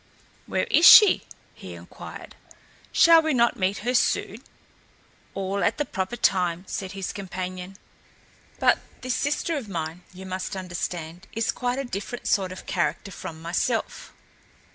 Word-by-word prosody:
"Where - - 0
is 340 - +7
she?" 420 -2 +8 0.3
he - - -10
inquired. - - -11 0.6
"Shall 330 -1 +7
we 315 -3 0
not 235 -1 +3
meet 190 +1 0
her 250 - +1
soon?" 245 - 0 0.9
"All 195 +1 -2
at - - +1
the 295 - -1
proper 190 +1 -3
time," 180 -5 +1
said 190 0 -5
his 195 -1 -5
companion. 185 -1 -6 0.8
"But - - +3 0.2
this 255 -1 -2
sister 295 +5 -1
of 235 -7 -7
mine, 165 -1 -4
you 185 +1 -11
must 185 +1 -4
understand, 175 -1 -5
is 225 0 0
quite 250 0 -2
a 275 - -2
different 225 +2 -6
sort 190 -2 +1
of 185 - -9
character 185 +2 -2
from 160 -3 -8
myself. 185 +7 -2
190 Hz, 145 wpm, -25 LUFS, 180-245 Hz, 0.9 s, she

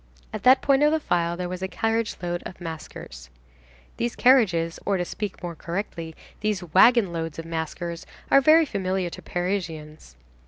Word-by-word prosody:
At - - -4
that 260 +1 +5
point 275 0 +3
of 300 0 +5
the 315 - +2
file 170 - 0
there 180 0 -3
was 180 0 -6
a 190 - -1
carriage 225 +3 -1
load 175 0 -2
of 185 - -9
maskers. 155 - -9 0.7
These 235 0 -2
carriages, 185 -11 +3
or 200 -1 0
to 175 - -2
speak 205 +1 -6
more 175 -1 -4
correctly, 170 -1 -5 0.2
these 210 -3 -1
wagon 190 +3 +4
loads 165 -2 -4
of 165 - -6
maskers 165 +1 -5 0.2
are 275 - +7
very 315 +3 +6
familiar 190 - -2
to - - -9
Parisians. 165 - -4
180 Hz, 170 wpm, -25 LUFS, 165-220 Hz, 0.7 s, are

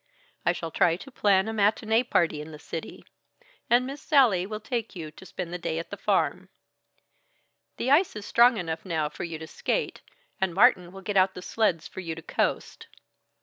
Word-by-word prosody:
I - - +6
shall 165 -2 -5
try 165 +1 +3
to 275 +10 -11
plan 200 -4 +3
a 220 - -3
matinée 220 +3 +2
party 165 -3 +2
in 155 +1 -9
the 150 - -9
city, 160 +1 -8 0.6
and 245 +1 +4
Miss 275 +2 -7
Sallie 230 - +4
will 215 0 -5
take 230 -1 -4
you 160 -3 -6
to 190 +5 -14
spend 175 -2 -6
a 180 - -4
day 160 - -3
at 165 - -5
the - - -3
farm. - - 0 1.3
The 260 - -1
ice 330 +2 +4
is 210 -1 -6
strong 240 +2 +5
enough 165 -3 -4
now 160 -5 -1
for - - -7
you 165 -2 -5
to 160 - -8
skate, - - -2 0.4
and 190 -3 -1
Martin 190 -5 +4
will 195 +1 -10
get 200 +1 -2
out 190 0 +4
the 180 - -8
sleds 180 -8 0
for - - -9
you 165 -3 -4
to 165 - -10
coast. - - -2
190 Hz, 200 wpm, -27 LUFS, 165-220 Hz, 1.3 s, I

